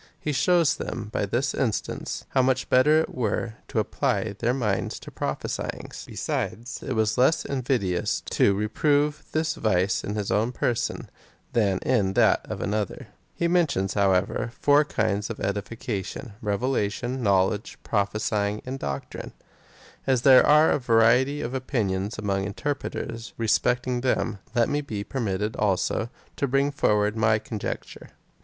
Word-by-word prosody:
He 150 - -2
shows 170 +2 +3
them 110 -3 -5
by 100 - 0
this 120 +7 0
instance, 115 -6 -2
how 130 - +3
much 130 0 0
better 150 +5 +5
it - - -5
were 115 -1 -1
to - - -5
apply - - 0
their 120 +1 +1
minds 110 -7 -1
to - - -11
prophesyings. - - -4
Besides, 120 +4 -3
it 135 - -3
was 110 0 +1
less 130 +6 +3
invidious 120 -10 0
to 100 - +3
reprove 145 +8 +1
this 160 +1 0
vice 95 - +1
in 105 - -3
his 105 -2 -2
own 115 +4 +1
person, 120 -2 -1 0.5
than 100 -5 +2
in 100 -6 +2
that - - +4
of - - -4
an 100 - -1
other. 105 -3 -3 0.3
He 170 - 0
mentions, 155 - +1
however, 100 +3 +1
four 145 +1 +5
different 150 - -17
kinds 100 0 -1
of - - -5
edification 105 +2 -4
— - - -30
revelation, 120 +2 -1
knowledge, 100 0 +1
prophesyiiig, 105 0 0
and 130 +1 -5
doctrine. 70 - -5 0.7
As 130 -3 +2
there 130 -2 +8
are 150 +2 +6
a - - +2
variety 125 +4 +3
of 120 - -4
opinions 105 -6 -1
among 100 -2 -1
interpreters 115 0 -4
respecting 125 +2 +1
them, 115 -5 0 0.2
let 120 -1 +4
me 145 +1 0
be 105 -8 -5
permitted, 105 -4 -2
also, 105 +3 0 0.3
to 140 - 0
bring 135 +2 +2
forward 105 -6 +2
my 110 -1 +3
con 110 0 -6
jecture. - - -6
115 Hz, 150 wpm, -25 LUFS, 100-130 Hz, 0.7 s, there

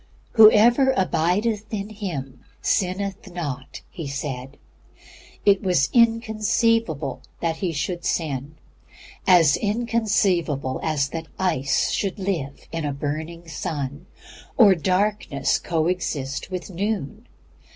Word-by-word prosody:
"Whosoever 235 +4 +6
abideth 190 +5 0
in 205 -1 -3
Him 165 - -6 0.2
sinneth 190 0 -1
not," 145 -6 -5
he 165 -4 -6
said. 135 -1 -5 0.9
It 200 -1 +5
was 180 -9 +2
inconceivable 225 - +2 0.2
that 165 -1 -1
he 185 -3 -1
should 170 +3 -3
sin, 145 -2 -2 0.7
as 170 -6 +6
inconceivable 205 - 0
as 150 -3 0
that 165 +1 -6
ice 140 -8 +1
should 195 -1 -1
live 175 -9 -4
in 165 -1 -3
a 145 -1 -1
burning 160 +4 -5
sun, 145 0 -5 0.5
or 210 -5 +8
darkness 185 -4 0
coexist 160 -5 -2
with 185 +1 -5
noon. 195 -4 -3
175 Hz, 105 wpm, -23 LUFS, 145-205 Hz, 0.9 s, or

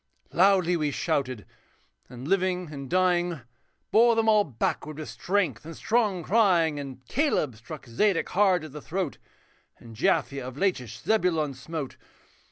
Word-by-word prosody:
Loudly 185 -1 +4
we 155 -3 0
shouted, 130 - -2 0.6
and 125 +2 -8
living 180 -2 0
and 140 -2 -7
dying. 175 -3 +1 0.5
Bore 230 +1 +5
them 225 0 +1
all 215 -1 +5
backward 145 - -3
with 155 - -6
strength 180 - -1
and 165 +1 -9
strong 210 -6 +1
crying; 175 -7 +3
And 135 -2 -8
Caleb 245 - 0
struck 135 +8 -10
Zedek 165 - +1
hard 185 -3 +3
at 155 - -8
the 150 +1 -8
throat, 180 -2 -3 0.6
And 115 -1 -13
Japhia 140 - +1
of 130 +1 -8
Lachish 125 - -2
Zebulon 170 -9 +1
smote. 140 +2 -6
165 Hz, 145 wpm, -27 LUFS, 140-190 Hz, 0.6 s, Bore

